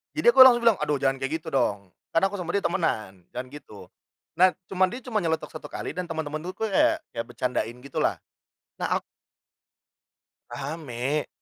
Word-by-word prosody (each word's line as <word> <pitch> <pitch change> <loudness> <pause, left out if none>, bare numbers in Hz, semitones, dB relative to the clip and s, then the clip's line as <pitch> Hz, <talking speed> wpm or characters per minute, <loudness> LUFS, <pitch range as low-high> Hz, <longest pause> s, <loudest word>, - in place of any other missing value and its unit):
Jadi 270 -6 +5
aku 265 - +1
langsung 240 -2 +7
bilang, 230 -4 +5
"Aduh 150 -1 +1
jangan 135 0 +2
kayak 155 +4 -2
gitu 160 - -15
dong, 100 -8 0 0.2
kan 165 - +4
aku 195 0 +1
sama 175 -1 -3
dia 200 - +1
temenan, 105 - -1
jangan 125 +1 -4
gitu." 110 -8 -11 0.6
Nah, 185 +1 +6 0.2
cuman 190 0 +3
dia 255 - -6
cuma 235 -4 -3
nyeletuk 160 -3 -1
1 155 - -9
kali - - -5
dan 180 - -2
teman-teman 155 -2 -3
tuh 185 - -4
ku - - -6
kayak 310 +8 +3
kayak 115 0 -4
bercandain 120 -1 -2
gitu 140 - -9
lah, - - 0 0.6
nah - - -2
aku - - -25 1.5
rame, 140 -1 -3
155 Hz, 185 wpm, -26 LUFS, 130-190 Hz, 1.5 s, langsung